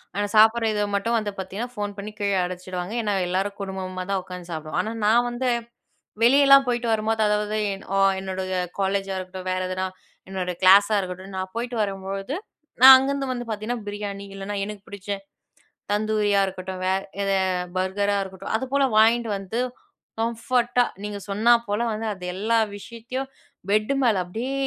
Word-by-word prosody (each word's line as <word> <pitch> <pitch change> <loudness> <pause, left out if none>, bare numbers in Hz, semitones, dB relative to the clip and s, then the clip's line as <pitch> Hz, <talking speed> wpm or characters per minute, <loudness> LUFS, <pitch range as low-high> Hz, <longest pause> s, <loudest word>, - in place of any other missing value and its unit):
ஆனா, 205 - 0
சாப்டுற 225 +2 +6
இத 210 - 0
மட்டும் 230 +4 0
வந்து 210 -1 -3
பாத்தீங்கன்னா, 195 +6 -4
ஃபோன் 205 -1 -4
பண்ணி 205 +1 -6
கீழ 200 0 0
அழைச்சிடுவாங்க. 180 +2 -5
ஏன்னா, 210 -2 0
எல்லாரும் 195 +3 -1
குடும்பமாதான் 190 0 -3
உக்காந்து 180 -1 -9
சாப்டுவோம். 155 0 -4
ஆனா, 220 - -4
நான் 235 +3 +4
வந்து 245 +1 -1 0.7
வெளியலாம் 275 +2 +7
போயிட்டு 240 -1 0
வரும்போது, 220 0 0
அதாவது 210 0 0 0.4
அ - - +2 0.2
என்னோட 190 0 -4 0.4
காலேஜா 195 0 0
இருக்கட்டும், 185 0 -7
வேற 185 - -1
எதுனா, 185 0 -2 0.4
என்னோட 185 -2 -2
கிளாஸா 200 +3 +7
இருக்கட்டும். 185 +1 -6
நான் 185 0 -4
போயிட்டு 240 +1 -3
வரும்பொழுது, 195 +4 -4 0.5
நான் 265 +1 +12
அங்கருந்து 275 +1 -1
வந்து 245 -1 -5
பாத்தீங்கன்னா 220 +3 -3
பிரியாணி, 205 -1 -5
இல்லன்னா, 195 +1 -5
எனக்கு 205 -1 -8
பிடிச்ச 200 0 -10 0.8
தந்தூரியா 210 -1 +2
இருக்கட்டும், 185 0 -6
வே 185 - +3 0.3
எத 195 - 0 0.5
பர்கரா 200 +2 0
இருக்கட்டும் 190 +1 -6
அதுபோல 265 +4 0
வாங்கிட்டு 230 +1 +4
வந்து, 195 +5 -3 0.6
கம்ஃபோர்ட்டா 240 +1 +1 0.2
நீங்க 210 -1 -4
சொன்னாப்போல 225 +1 +3
வந்து, 220 +1 -3
அது 185 -2 -11
எல்லா 220 +5 +1 0.2
விஷயத்தையும் 235 +5 -6 0.4
பெட் 215 +5 +2
மேல 225 -6 +3
அப்பிடியே 225 +9 -4
205 Hz, 150 wpm, -24 LUFS, 190-230 Hz, 0.8 s, நான்